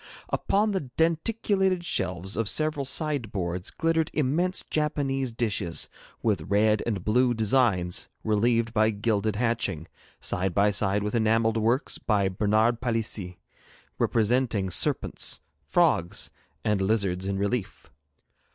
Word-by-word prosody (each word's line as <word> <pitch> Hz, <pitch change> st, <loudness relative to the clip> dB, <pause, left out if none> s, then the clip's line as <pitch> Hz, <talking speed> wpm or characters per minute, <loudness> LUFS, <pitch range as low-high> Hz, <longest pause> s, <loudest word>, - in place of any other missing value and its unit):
Upon 210 Hz, +2 st, +1 dB
the 185 Hz, -10 st, -3 dB
denticulated 185 Hz, +2 st, +1 dB
shelves 95 Hz, -, -1 dB
of 110 Hz, -1 st, 0 dB
several 155 Hz, -3 st, 0 dB
sideboards 105 Hz, -, -1 dB
glittered 165 Hz, -1 st, 0 dB
immense 155 Hz, +6 st, 0 dB
Japanese 135 Hz, -4 st, -1 dB
dishes 105 Hz, -7 st, -1 dB, 0.3 s
with -, -, 0 dB
red 105 Hz, +1 st, +3 dB
and 100 Hz, -6 st, -2 dB
blue 120 Hz, +3 st, +3 dB
designs 110 Hz, -6 st, +1 dB
relieved 115 Hz, +1 st, +1 dB
by 110 Hz, -1 st, +3 dB
gilded 105 Hz, 0 st, 0 dB
hatching, 105 Hz, -8 st, -1 dB, 0.3 s
side 90 Hz, -1 st, -2 dB
by 100 Hz, +1 st, +4 dB
side 100 Hz, 0 st, +1 dB
with 105 Hz, -, -2 dB
enamelled 115 Hz, 0 st, +2 dB
works 115 Hz, +5 st, 0 dB
by 100 Hz, -3 st, +1 dB
Bernard 110 Hz, +5 st, +1 dB
Palissy, 110 Hz, -7 st, -2 dB, 0.6 s
representing 115 Hz, -4 st, +1 dB
serpents, 80 Hz, -, 0 dB, 0.3 s
frogs, 85 Hz, +4 st, +1 dB, 0.3 s
and 105 Hz, -2 st, +1 dB
lizards 95 Hz, -2 st, 0 dB
in 100 Hz, 0 st, -1 dB
relief. 100 Hz, +2 st, -3 dB
110 Hz, 115 wpm, -26 LUFS, 100-130 Hz, 0.6 s, by